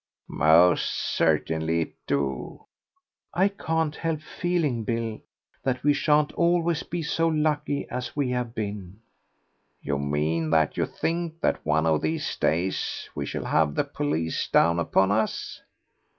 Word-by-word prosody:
"Most 80 +3 +4
certainly 80 +1 0
it - - -4
do." 70 -2 -2 0.7
"I 190 +4 +4
can't 160 -5 -1
help 165 -2 -2
feeling, 155 -9 -1
Bill, 115 -1 -3 0.4
that 130 -1 -2
we 145 0 +4
shan't 150 +1 +2
always 170 -1 +2
be 170 -1 -4
so 165 +1 +1
lucky 150 -2 0
as 125 -1 -5
we 140 -4 0
have 125 -2 -2
been." 100 -3 -5 0.8
"You 70 0 -2
mean 75 +3 0
that 80 -1 +2
you - - 0
think 165 -1 -3
that - - 0
one 80 - +1
of 80 -1 +2
these 80 +1 -2
days 90 +4 -1
we 70 -1 -4
shall - - -4
have 75 -2 +2
the - - +2
police 80 +2 -2
down 85 +1 +3
upon 95 +3 +2
us?" 110 +1 -1
110 Hz, 140 wpm, -26 LUFS, -, 0.8 s, Most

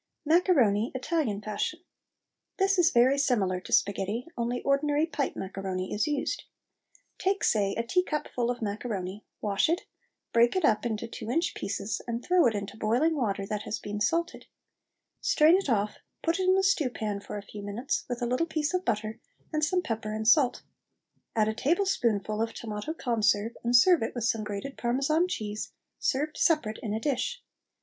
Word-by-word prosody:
MACARONI 280 - +3
ITALIAN 260 -6 -1
FASHION. 215 +10 -2 0.8
This 390 -1 +2
is 345 -1 +6
very 260 0 +4
similar 205 -10 +1
to - - -11
sparghetti, 200 +4 +1
only 240 +1 -2
ordinary 290 +2 +2
pipe 300 -4 -2
macaroni 190 -1 -4
is 210 - 0
used. 295 -2 -2 0.7
Take, 390 +1 0
say, 200 -2 +2
a 230 - 0
teacupful 295 -3 -1
of 245 -2 -2
macaroni, 205 -2 -4 0.2
wash 205 +6 +1
it, 340 +2 +1 0.5
break 235 +5 +4
it 370 -4 +2
up 220 0 +2
into 225 0 -3
two 225 - -7
inch 330 +7 +1
pieces, 200 +2 -3
and 235 +1 -3
throw 360 -6 +5
it 225 - 0
into 200 +1 -5
boiling 245 +10 +2
water 200 -8 -1
that 210 +1 -3
has 215 0 -3
been 205 0 -5
salted. 335 - 0 0.7
Strain 315 +3 +5
it 385 -6 0
of 235 - +5
off, - - -19 0.3
put 335 +2 +1
it 370 0 +2
in 375 - +6
the 385 - +2
stew 380 -8 +2
pan 210 -4 -3
for 200 - -7
a 205 - -6
few 205 0 -9
minutes, 205 +7 -2
with 245 0 -3
a - - +2
little 250 +7 0
piece 310 0 -1
of 365 0 0
butter 215 -3 -2 0.3
and 310 0 0
some 360 +4 +2
pepper 220 -5 -3
and 220 0 -3
salt. 255 +1 +4 0.7
Add 215 -1 +3
a 220 - 0
tablespoonful 230 - +1
of 225 0 -2
tomato 220 +8 -5
conserve, 225 -4 +1
and 240 +1 +2
serve 345 +8 +6
it 225 - -3
with 240 - -3
some 225 -1 +1
grated 210 +6 -6
Parmesan 275 +8 +2
cheese, 215 - -4 0.3
served 295 +3 -1
separate 275 -10 +2
in 215 - -3
a 215 - -1
dish. 300 - -2
240 Hz, 180 wpm, -28 LUFS, 210-305 Hz, 0.8 s, is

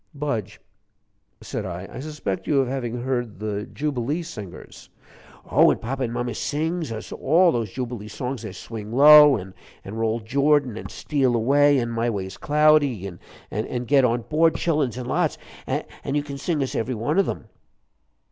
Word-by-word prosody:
"Budge," 140 -8 -3 0.8
said - - -5
I, 90 0 -6
"I 120 - -7
suspect 145 -9 -4
you 145 - +3
of 135 - +1
having 120 -2 -3
heard 120 -4 -2
the 105 -1 -4
Jubilee 145 +2 -2
Singers." 105 - -10 0.6
"Oh, - - +5
and - - +1
papa 135 +4 -4
and 120 -3 -1
mama 120 0 -2
sings 160 +4 -2
us 110 -1 -7
all 170 +5 +3
those 115 -6 -2
Jubilee 120 -4 -5
songs 125 +3 -5
there's 105 -5 -8
'Swing 110 0 -8
Low,' 150 +2 +8
an' 95 -1 -9 0.3
'Roll 110 +3 -1
Jordan,' 140 +1 +2
an' - - -7
'Steal 135 -5 0
Away,' 140 +5 +4
an' 120 -1 -2
'My 115 +1 0
Way's 95 -3 -4
Cloudy,' 145 -8 +3 0.4
an' 120 +4 -3
'Get 135 +2 +4
on 120 -1 +1
Board, 160 +6 +2
Childuns,' 150 -8 0
an' 125 - -5
lots. - - 0 0.3
An' 140 - -4
you 145 - +1
can 140 -1 -7
sing 150 0 -1
us 130 - -4
every 120 +3 -2
one 145 - 0
of 195 - +2
'em." - - -5
125 Hz, 170 wpm, -23 LUFS, 115-145 Hz, 0.8 s, Low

